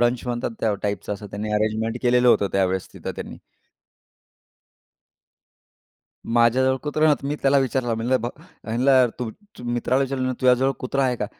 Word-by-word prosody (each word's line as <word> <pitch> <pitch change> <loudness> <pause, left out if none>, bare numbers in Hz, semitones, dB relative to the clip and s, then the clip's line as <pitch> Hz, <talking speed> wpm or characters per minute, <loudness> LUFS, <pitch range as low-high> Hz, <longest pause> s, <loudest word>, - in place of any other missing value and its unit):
Brunch 120 0 +2
म्हणतात 120 -1 -2
त्या 110 -2 +1
टाइपचं 100 -1 -2
असं 105 +1 -9
त्यांनी 105 +1 -4
अरेंजमेंट 110 +2 0
केलेलं 125 0 +4
होतं 100 -4 +4
त्यावेळेस 95 -1 0
तिथं - - -6
त्यांनी. - - -7 2.9
माझ्याजवळ 120 +3 +3
कुत्रा 150 +1 0
नव्हता, 150 -2 +3
तर - - -4
मी 145 - -1
त्याला 140 0 +4
विचारलं 130 -3 0
म्हणलं 120 +3 0
ब 120 - -3 0.4
म्हणलं 125 +3 +3
तू, 120 -3 -3
तू 205 - -16
मित्राला 120 +2 0
विचारलं, 130 -1 -1
"तुझ्याजवळ 130 +1 +4
कुत्रा 135 +2 -1
आहे 125 -1 +1
का?" 105 - -3
125 Hz, 160 wpm, -23 LUFS, 110-130 Hz, 2.9 s, केलेलं